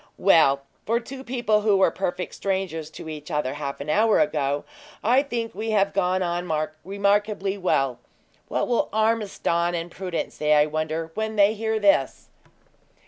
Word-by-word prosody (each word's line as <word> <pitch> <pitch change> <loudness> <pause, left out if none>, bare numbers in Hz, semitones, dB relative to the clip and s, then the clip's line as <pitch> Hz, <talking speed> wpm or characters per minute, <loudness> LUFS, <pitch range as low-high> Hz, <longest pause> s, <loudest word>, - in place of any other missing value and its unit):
"Well, 150 -7 +4 0.2
for 230 +2 +2
two 260 +2 -9
people 240 -4 +1
who 210 -2 +3
were 190 - +4
perfect 180 -1 -3
strangers 190 -5 -3
to 160 - -10
each 155 0 -7
other 150 -4 -1
half 145 -1 -5
an 140 - -6
hour 215 +4 +4
ago, 145 -7 0 0.4
I 250 +5 +4
think 240 -5 -4
we 220 +3 -4
have 200 0 +2
gone 185 -1 +1
on 175 0 -2 0.3
remarkably 200 +1 0
well. 135 -10 0 0.5
What - - -1
will 240 - +1
Mr. 220 - -1
Ormiston 175 -6 -1
and 170 0 -4
Prudence 180 -2 -4
say, 150 0 +2
I 150 0 +5
wonder, 155 +1 -3
when 220 +2 -3
they 205 0 +5
hear 220 0 -1
this?" 200 -10 +2
190 Hz, 165 wpm, -24 LUFS, 155-215 Hz, 0.5 s, I